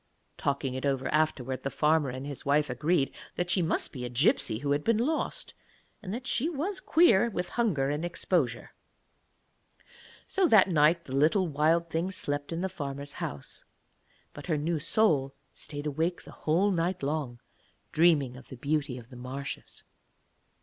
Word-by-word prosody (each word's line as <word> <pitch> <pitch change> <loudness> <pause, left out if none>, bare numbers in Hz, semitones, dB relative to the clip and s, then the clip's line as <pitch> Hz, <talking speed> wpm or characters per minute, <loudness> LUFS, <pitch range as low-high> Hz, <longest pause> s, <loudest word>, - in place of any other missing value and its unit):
Talking 140 -2 -1
it 130 - -4
over 135 -2 0
afterwards, 135 -4 0
the 140 - -2
farmer 150 -1 +2
and 130 +2 -6
his 140 -2 -6
wife 145 +1 +2
agreed 155 -3 +1 0.2
that 175 0 -1
she 180 - +3
must 165 - -1
be 125 -3 -6
a 125 - -3
gipsy 120 -3 +2
who 140 +4 -2
had 145 +1 +1
been 230 -1 +3
lost, 315 - -1 0.5
and 190 -4 -6
that 245 +4 -5
she 270 +5 0
was 350 +5 -2
queer 235 - +4
with 180 -4 -3
hunger 160 - +1
and 150 +2 -2
exposure. 170 -7 -1 1.5
So 385 -2 +2
that 215 - +6
night 165 +1 +3
the 130 - -5
little 160 +7 +3
Wild 165 +3 +1
Thing 165 +3 0
slept 145 -6 -3
in 165 +1 -2
the 190 - 0
farmer's 140 -5 -6
house, 70 -1 -5 0.7
but 145 - -10
her 160 -4 +1
new 160 +2 -1
soul 145 -6 +2 0.2
stayed 145 -1 -7
awake 160 +4 -1
the - - -12
whole 180 +7 +1
night 180 0 -1
long 140 -4 -2 0.5
dreaming 150 -6 +3
of 130 - -13
the 130 - -9
beauty 140 -1 -1
of 120 -1 -11
the 130 - -12
marshes. 130 +3 -6
155 Hz, 170 wpm, -29 LUFS, 140-180 Hz, 1.5 s, that